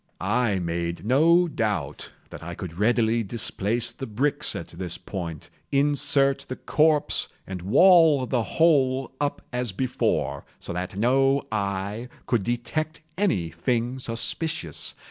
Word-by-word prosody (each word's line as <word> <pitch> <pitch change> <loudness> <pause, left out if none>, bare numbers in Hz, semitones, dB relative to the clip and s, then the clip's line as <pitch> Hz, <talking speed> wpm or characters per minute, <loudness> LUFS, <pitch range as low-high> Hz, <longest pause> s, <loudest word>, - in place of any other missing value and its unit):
I 105 +1 +1
made 85 0 -3
no 165 +8 +4
doubt 100 - -2 0.2
that - - -9
I - - -6
could - - -7
readily 115 +1 +2
displace 115 +2 -2
the 130 +2 -7
bricks 130 +7 0
at - - -6
this 90 -3 -5
point, 85 -5 -7 0.2
insert 140 -1 +3
the 130 - -3
corpse, 155 +1 +2 0.2
and 95 -2 -6
wall 155 - +5
the 125 -1 0
whole 135 -2 +2
up 145 -1 -1
as 125 -3 -1
before, 125 +6 -1
so - - -7
that 90 +2 -4
no 135 +5 +3
eye 100 +3 -3 0.2
could 115 -5 +1
detect 145 +7 -3
any 170 - 0
thing 120 - -1
suspicious. 115 - -2
120 Hz, 130 wpm, -25 LUFS, 100-140 Hz, 0.2 s, wall